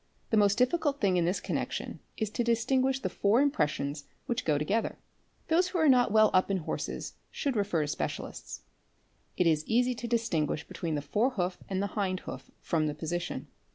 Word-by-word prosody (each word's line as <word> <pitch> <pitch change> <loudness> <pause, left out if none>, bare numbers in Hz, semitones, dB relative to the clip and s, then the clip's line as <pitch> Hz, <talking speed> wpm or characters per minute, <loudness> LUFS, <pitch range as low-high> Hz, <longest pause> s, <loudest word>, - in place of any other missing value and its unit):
The - - +4
most 205 0 +4
difficult 280 +3 +2
thing 185 -3 +3
this 180 +3 +1
connection - - -3 0.2
is 215 -2 -2
to 240 - 0
distinguish 260 +3 +2
the - - -1
four 205 +4 +2
impressions 150 - 0 0.2
which 240 +1 -2
go 150 -2 +3
to 150 - -1
gether. 220 +6 0 0.5
Those 350 +3 +3
who 365 - -3
are 320 -2 +4
not 250 -4 +5
well 215 0 +5
up 185 +1 +3
in 195 - +1
horses - - -4 0.2
should 280 -4 -2
refer 200 -7 +1
to - - -3
specialists. 150 - -5 0.7
It 180 - +3
is 155 -2 +3
easy 245 +2 +3
to 240 0 -5
distinguish 225 -11 0
between 165 -3 -3
the 145 - -2
fore 210 - +2
hoof 180 -7 -2
and 190 0 0
the 200 - -4
hind 185 -3 -1
hoof - - -8
from 155 -3 0
the 150 - -3
position. 170 +3 -3
205 Hz, 190 wpm, -30 LUFS, 170-245 Hz, 0.7 s, not